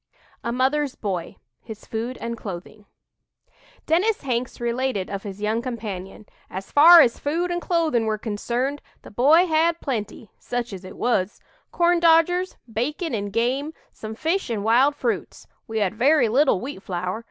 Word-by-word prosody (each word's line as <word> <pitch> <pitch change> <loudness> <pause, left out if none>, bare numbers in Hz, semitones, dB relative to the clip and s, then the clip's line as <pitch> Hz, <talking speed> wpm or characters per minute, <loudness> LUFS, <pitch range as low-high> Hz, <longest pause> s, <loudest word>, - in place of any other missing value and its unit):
A 235 - -2
"MOTHER'S 265 +3 0
BOY" 185 -5 -4 0.3
HIS 220 -2 -10
FOOD 230 +3 -4
AND 235 0 -4
CLOTHING 205 0 -9 1.0
Dennis 380 +6 +1
Hanks 245 -2 -2
related 240 -4 -2
of 200 -1 -4
his 200 0 -8
young 220 +2 0
companion: 215 -5 -6 0.2
"As 190 +1 -7
far 330 +4 +9
as 235 -5 +2
food 335 +5 -1
and 350 0 -2
clothing 315 -11 +1
were 215 0 0
concerned, 240 +6 -3 0.2
the - - -12
boy 290 - +5
had 330 0 +2
plenty 225 - -5
such 245 -2 -4
as 190 -1 -8
it 185 - -10
was 210 -5 0 0.3
'corndodgers,' 345 +1 +3 0.2
bacon 295 - -2
and 205 -2 -3
game, 260 +8 -1 0.2
some 220 0 -8
fish 325 - -1
and 215 -4 -2
wild 255 +6 +4
fruits. 240 - -3 0.2
We 225 -1 -4
had 205 -3 +1
very 255 +2 +3
little 265 -3 +3
wheat 255 -4 -7
flour. 185 +2 -3
240 Hz, 155 wpm, -23 LUFS, 215-300 Hz, 1.0 s, far